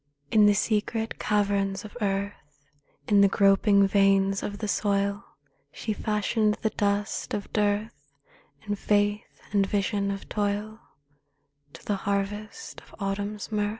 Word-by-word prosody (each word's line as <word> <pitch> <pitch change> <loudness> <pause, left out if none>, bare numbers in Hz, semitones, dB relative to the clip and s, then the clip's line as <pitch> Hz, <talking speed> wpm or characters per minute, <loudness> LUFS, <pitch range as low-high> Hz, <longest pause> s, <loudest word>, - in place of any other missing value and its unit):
In 210 -1 +6
the 205 - +4
secret 220 +2 -1
caverns 200 -1 0
of 210 - -11
earth, 195 -8 -4 0.4
In 205 -1 +5
the 200 - +7
groping 200 +1 +4
veins 195 0 +3
of 205 - -4
the 215 - -4
soil, 200 -1 0 0.5
She 215 - -3
fashioned 210 0 0
the 220 - +1
dust 205 0 -1
of 205 - -6
dearth, 210 +1 +1 0.7
In 205 - -2
faith 205 +1 -1
and 200 -1 +3
vision 200 0 0
of 195 0 -5
toil, 210 +1 -2 0.9
To - - -13
the 205 - 0
harvest 200 - -4
of - - -17
Autumn's 200 +1 -3
mirth. 210 -1 0
205 Hz, 135 wpm, -26 LUFS, 200-210 Hz, 0.9 s, the